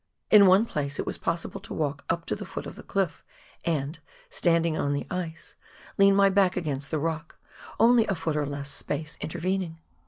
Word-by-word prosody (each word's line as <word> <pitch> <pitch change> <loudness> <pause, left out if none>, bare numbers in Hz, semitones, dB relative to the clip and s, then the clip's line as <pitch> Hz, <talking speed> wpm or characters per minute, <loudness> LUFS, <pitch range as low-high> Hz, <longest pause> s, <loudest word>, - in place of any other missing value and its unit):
In 205 -2 +9
one 190 +4 +6
place 145 -8 -3
it - - -2
was - - -4
possible 165 0 -2
to - - -7
walk 145 -2 -2
up 165 0 -1
to - - -1
the - - -7
foot - - -6
of - - -7
the - - -10
cliff 190 -6 -2 0.4
and, 155 -1 -1 0.3
standing 165 -2 +2
on 145 -2 0
the 140 - -2
ice, 175 -3 -5 0.5
lean 195 0 +6
my 200 0 +6
back 190 -1 +3
against 145 -5 -3
the 155 - 0
rock, 160 +1 -3 0.4
only 230 0 +5
a 195 - 0
foot 160 -2 -2
or 150 -1 0
less 140 0 -4
space 155 +2 -3
intervening. 180 +1 -2
165 Hz, 195 wpm, -27 LUFS, 150-190 Hz, 0.5 s, In